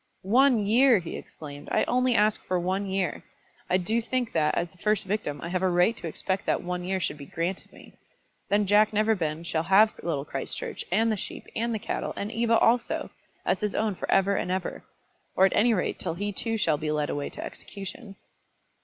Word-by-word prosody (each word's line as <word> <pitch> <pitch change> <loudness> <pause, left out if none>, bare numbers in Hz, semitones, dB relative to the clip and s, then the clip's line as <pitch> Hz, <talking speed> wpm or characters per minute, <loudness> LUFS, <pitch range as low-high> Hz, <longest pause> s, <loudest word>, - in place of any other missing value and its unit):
"One 240 +2 +4
year!" 240 +3 +5
he 170 -3 -5
exclaimed. 145 -1 -9
"I - - +3
only 250 0 +2
ask 215 0 +2
for 185 -1 0
one 190 +3 -1
year. 190 -1 -2 0.5
I 185 - +4
do 220 +6 0
think 245 0 -2
that, 155 -2 +2
as 170 - 0
the 185 - -24
first 210 0 +1
victim, 190 -8 -2
I 170 - -4
have 185 0 -1
a 190 - +2
right 180 +6 +3
to - - -6
expect 190 +4 -3
that - - +1
one 180 0 -3
year 190 +1 -1
should 150 - -3
be 140 - -9
granted 175 +3 -3
me. - - -15 0.6
Then 205 +1 +3
Jack 210 +2 +4
Neverbend 180 -7 0
shall 160 -2 0
have 195 +6 +5
Little 150 -5 -2
Christchurch, - - -4
and 225 +4 +3
the 215 - 0
sheep, - - -7
and 235 +1 0
the 225 - 0
cattle, - - -3
and 205 +2 -4
Eva 230 0 +2
also, 235 +1 +1 0.3
as - - +1
his 210 -2 -2
own 215 -1 +1
for - - -6
ever 195 +1 +3
and - - -1
ever, 185 0 -3 0.5
or 190 - +6
at 195 - +2
any 235 +3 +4
rate 200 -5 0
till 165 -3 -3
he 205 +3 -3
too 225 +3 -1
shall 155 -8 +1
be 155 -1 -2
led 150 -1 0
away 145 -1 -3
to - - -7
execution!" 200 +1 -9
195 Hz, 215 wpm, -27 LUFS, 175-220 Hz, 0.6 s, or